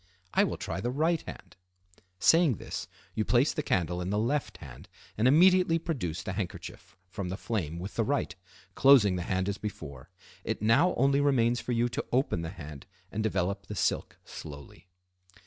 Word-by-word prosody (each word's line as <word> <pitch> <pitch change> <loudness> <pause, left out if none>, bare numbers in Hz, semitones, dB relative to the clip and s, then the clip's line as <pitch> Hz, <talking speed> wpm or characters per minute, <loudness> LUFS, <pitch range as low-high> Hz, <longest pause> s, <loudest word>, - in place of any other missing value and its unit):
I - - +4
will - - -3
try 95 - -4
the 120 - -1
right 160 +5 +1
hand." - - -11 0.6
Saying 160 - +4
this, - - -6 0.3
you 110 - 0
place 125 +6 +3
the - - -2
candle 90 - 0
in 90 - -3
the 105 - 0
left 135 +7 -1
hand 65 -6 -12 0.3
and 110 +4 +2
immediately 180 +3 +5
produce 120 - -3
the 95 - -4
handkerchief 95 -3 -7
from 95 0 -5
the 95 - -4
flame 90 -9 -3
with 95 +4 -6
the 115 - +3
right, 135 -7 -1 0.4
closing 125 -8 +6
the 90 - -2
hand 95 0 0
as 100 0 -3
before. 70 -11 -7 0.3
It - - -2
now 120 - +3
only 140 +2 +3
remains 120 -4 +2
for - - -4
you 120 +1 +2
to 120 - -4
open 125 -9 +1
the 80 - -4
hand 75 -6 -10 0.2
and 110 - -2
develop 100 -1 -1
the 105 - -6
silk - - -1
slowly. 75 +3 -10
105 Hz, 180 wpm, -29 LUFS, 90-135 Hz, 0.6 s, closing